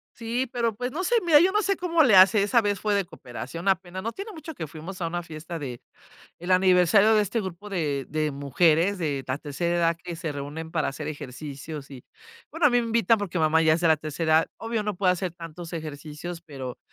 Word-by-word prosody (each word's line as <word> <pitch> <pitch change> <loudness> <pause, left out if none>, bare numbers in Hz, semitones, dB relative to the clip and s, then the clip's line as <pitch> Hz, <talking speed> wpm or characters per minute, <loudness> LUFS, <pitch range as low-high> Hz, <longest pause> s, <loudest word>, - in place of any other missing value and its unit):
Sí, 235 +3 -2
pero, 235 -3 -1
pues, 250 +3 -3
no 335 +7 -3
sé, 480 - +2
mira, 315 -4 +7
yo 370 +4 +3
no 425 - +3
sé 395 -1 0
cómo 335 -3 +3
le 240 -8 +5
hace, 195 +2 +7
esa 235 +3 +3
vez 205 -2 -1
fue 210 -1 +1
de 200 -2 +1
cooperación, 160 +2 -8
apenas 185 0 -1
no 230 - -2
tiene 400 - -7
mucho 320 -1 -8
que 160 - -6
fuimos 165 +6 -9
a 165 - 0
una 175 +1 -3
fiesta 165 +1 -7
del 130 -6 -6 0.7
aniversario 185 +3 +5
de 215 - +4
este 215 +3 -1
grupo 190 +1 -7
de 150 -8 -2
de 155 0 -1
mujeres 160 +7 +2
de 145 -6 -2
la 130 +1 -1
tercera 170 +4 -2
edad 170 -1 +2
que 175 -1 -6
se 165 -2 -4
reúnen 145 +3 -6
para 155 -3 0
hacer 150 +2 -5
ejercicios, 145 +1 -7
y, 130 -3 -11 0.5
bueno, 325 -1 +3
a - - +4
mí 245 - +3
me 230 - -3
invitan 230 -1 +3
porque 185 -3 -3
mamá 160 +1 +3
ya 155 0 +4
sea 170 0 +1
la 160 - +5
tercera. 160 +1 +1
Obvio, 225 -1 -2
no 210 -1 -2
puede 185 -1 +3
hacer 180 -1 -3
tantos 165 0 -9
ejercicios, 155 +1 -6
pero 135 -6 -8
175 Hz, 225 wpm, -26 LUFS, 155-210 Hz, 0.7 s, mira